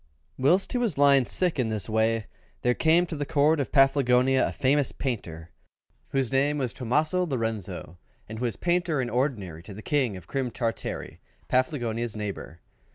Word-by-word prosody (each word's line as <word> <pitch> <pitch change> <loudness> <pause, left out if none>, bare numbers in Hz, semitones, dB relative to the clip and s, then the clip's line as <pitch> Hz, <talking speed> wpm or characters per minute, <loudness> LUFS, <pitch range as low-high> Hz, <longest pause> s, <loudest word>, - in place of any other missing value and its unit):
Whilst 170 +9 +2
he 250 - 0
was 225 - -1
lying 140 -2 +5
sick 180 0 -1
in 120 -3 +1
this 105 -3 -3
way, 110 0 +1 0.4
there 125 - +3
came 165 +6 +3
to 165 - -6
the 145 - -2
Court 145 +2 +2
of 140 - -2
Paflagonia 135 -2 +4
a - - -3
famous 140 +1 +1
painter, 85 - -5 0.6
whose 135 -3 -1
name 140 +2 +2
was 130 -4 -2
Tomaso 150 +8 0
Lorenzo, 110 - -4 0.3
and 110 0 -7
who 125 - -1
was 115 - -2
Painter 175 -3 0
in 125 -2 -2
Ordinary 110 - -2
to 100 +3 -11
the 105 - -10
King 130 -9 0
of 90 - -12
Crim 130 +6 -2
Tartary, 115 -1 -4 0.3
Paflagonia's 120 -4 0
neighbour. 100 -6 -6
130 Hz, 170 wpm, -26 LUFS, 110-145 Hz, 0.6 s, lying